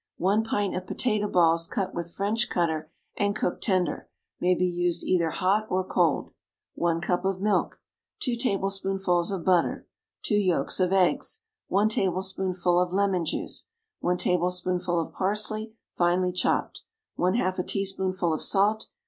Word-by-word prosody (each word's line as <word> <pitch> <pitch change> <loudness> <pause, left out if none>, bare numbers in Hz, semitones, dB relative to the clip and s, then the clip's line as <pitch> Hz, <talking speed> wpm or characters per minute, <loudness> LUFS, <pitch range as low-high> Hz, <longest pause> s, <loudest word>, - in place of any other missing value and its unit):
1 200 +5 +2
pint 205 -3 -1
of 185 0 -4
potato 215 -4 0
balls, 165 -3 +3
cut 200 -6 -2
with 170 0 -4
French 210 +6 0
cutter, 160 -3 -1 0.3
and 205 0 +1
cooked 180 - -2
tender, 185 -4 0 0.3
may 180 +1 +3
be 180 - +1
used 175 -1 0
either 170 -3 +2
hot 200 +6 +1
or 185 0 +1
cold. 175 -5 +1 0.4
1 170 -1 0
cup 180 +1 0
of 190 -1 -1
milk. 210 +1 0 0.4
2 250 -4 0
tablespoonfuls 195 -5 0
of 190 -4 -4
butter. 180 -2 +2 0.4
2 - - -1
yolks 185 -9 +1
of 185 -1 +2
eggs. 195 - +1 0.3
1 200 +3 +3
tablespoonful 185 -3 0
of 180 -1 -1
lemon 195 -2 +1
juice. 160 - -4 0.3
1 180 0 0
tablespoonful 180 0 0
of 165 - -4
parsley, 215 +3 0 0.2
finely 180 +1 +2
chopped. 180 0 0 0.4
1/2 185 0 +1
a - - +1
teaspoonful 190 -3 -1
of 155 - -2
salt. 210 +2 +1
185 Hz, 150 wpm, -27 LUFS, 175-200 Hz, 0.4 s, balls